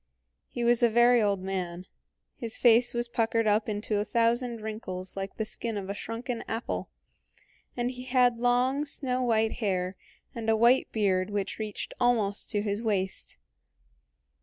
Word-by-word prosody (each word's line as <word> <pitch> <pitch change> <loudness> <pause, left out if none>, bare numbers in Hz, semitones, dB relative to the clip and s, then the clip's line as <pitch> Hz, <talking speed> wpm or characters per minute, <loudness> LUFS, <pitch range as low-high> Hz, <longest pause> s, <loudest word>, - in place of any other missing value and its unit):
He 240 - -4
was 235 0 +3
a 240 - +5
very 240 +1 +5
old 200 -3 +1
man; 180 -2 -4 0.5
his 230 -5 -4
face 240 0 +5
was 240 0 -1
puckered 230 -1 0
up 215 +1 +2
into 210 0 -1
a - - +1
thousand 235 +1 +1
wrinkles 190 -4 -5
like 195 0 -5
the 220 - -1
skin 225 0 -4
of 195 0 -4
a - - -2
shrunken 230 +3 -5
apple, 225 +2 -3 0.9
and 245 +1 0
he 250 0 -8
had 250 -2 +3
long, 250 +4 +2
snow 260 -3 -2
white 225 -2 +1
hair 185 -3 -1 0.4
and 225 -1 -3
a 220 - +4
white 240 +4 +4
beard 190 -3 +1
which 205 0 -3
reached 215 -2 -5
almost 220 -5 +2
to 205 -2 0
his 205 0 -2
waist. 195 -4 -2
225 Hz, 160 wpm, -28 LUFS, 205-240 Hz, 0.9 s, a